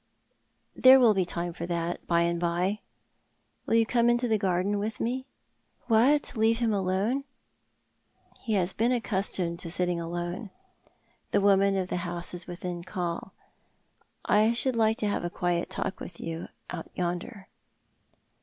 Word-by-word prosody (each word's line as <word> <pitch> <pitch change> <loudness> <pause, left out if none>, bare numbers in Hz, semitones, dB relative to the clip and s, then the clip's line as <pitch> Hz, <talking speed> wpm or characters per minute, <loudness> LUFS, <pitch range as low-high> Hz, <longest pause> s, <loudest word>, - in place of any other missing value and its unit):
" - - -45
There 260 +1 +10
will 235 -4 +6
be 190 -2 +1
time 175 0 -3
for 170 0 -6
that 170 0 -3
by 170 -1 +3
and 170 0 0
by. 175 +4 0 0.9
Will - - +2
you 230 0 +5
come 235 +1 +2
into 240 +1 +2
the 220 -2 +1
garden 195 +1 0
with 215 +2 -3
me 260 +3 -2 0.2
" - - -45
" - - -39
What, 270 +7 +4
leave 225 +1 +3
him 230 -2 +1
alone? 200 +7 0 0.4
" - - -45
" - - -32
He 225 - -2
has 190 -2 +1
been 235 +3 +1
accustomed 190 -7 -1
to 170 - -4
sitting 175 0 -1
alone. 175 +5 -4 0.8
The 205 - +2
woman 195 0 +4
of 185 -1 -2
the - - -1
house 175 0 -2
is 175 -1 -5
within 175 -1 -5
call. 175 0 -4 0.9
I 215 +2 +4
should 255 +1 +1
like 220 -1 +2
to 210 - -1
have 205 - -1
a 175 - -2
quiet 175 0 -1
talk - - -3
with - - -9
you 165 +1 -5 0.2
out 170 -2 -7
ytmder." 180 +3 -3
190 Hz, 175 wpm, -28 LUFS, 175-225 Hz, 0.9 s, There